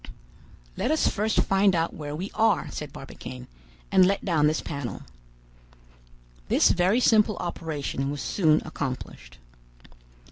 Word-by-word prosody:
"Let - - -1
us 310 +1 +2
first 215 +1 +1
find 195 -1 +3
out 165 0 0
where 145 -1 -6
we 185 +6 -5
are," 225 0 +1
said - - -6
Barbicane, 65 -1 -9 0.5
"and 185 - +6
let 195 +2 +1
down 160 -6 +3
this 155 +1 +1
panel." 140 -9 -6 1.4
This - - +4
very 185 +6 +2
simple 215 -4 +3
operation 150 -5 -3
was 145 0 -4
soon 155 0 +2
accomplished. 130 - -6
165 Hz, 130 wpm, -26 LUFS, 145-200 Hz, 1.4 s, and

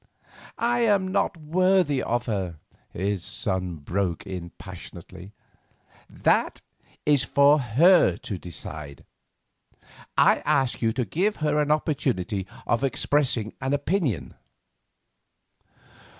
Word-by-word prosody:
"I 240 +1 +1
am 205 -5 +2
not 195 -2 0
worthy 170 -2 +2
of 120 +1 -1
her," 95 -7 -3 0.3
his 95 0 -2
son 95 -3 -2
broke 85 +3 -3
in 90 -2 -6
passionately. 90 +1 -11 0.8
"That - - +1 0.5
is 145 -3 +4
for 140 +4 +4
her 155 +9 +4
to 100 - -5
decide. 75 -4 -9 1.1
I - - +5
ask 135 -3 +1
you 115 -1 +2
to 125 0 -1
give 190 - 0
her 150 -1 0
an 150 0 +1
opportunity 125 - -1 0.2
of 120 +3 0
expressing 130 -4 0
an 135 +1 -1
opinion." 145 - -1
125 Hz, 105 wpm, -25 LUFS, 95-150 Hz, 1.1 s, I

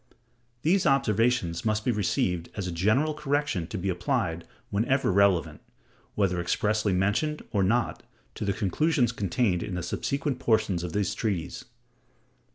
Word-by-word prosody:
These 180 +4 +3
observations 115 -9 +2
must 110 0 0
be 125 - +3
received 90 -5 0
as 100 - -3
a 90 - -3
general 110 - +2
correction 145 - -1
to 105 - -5
be 95 +2 -3
applied 85 -2 -1 0.2
whenever 120 +5 +1
relevant, 90 -5 +2 0.5
whether 90 -4 +1
expressly 105 +4 0
mentioned 105 +12 0
or 100 - +1
not, 110 +5 +1 0.3
to - - -6
the 100 - +1
conclusions 120 - +1
contained 100 -3 0
in 95 - -4
the 90 - -3
subsequent 140 -1 -2
portions 100 -6 +1
of 85 -2 -5
this 100 -1 0
treatise. 100 -8 -3
105 Hz, 145 wpm, -27 LUFS, 90-125 Hz, 0.5 s, These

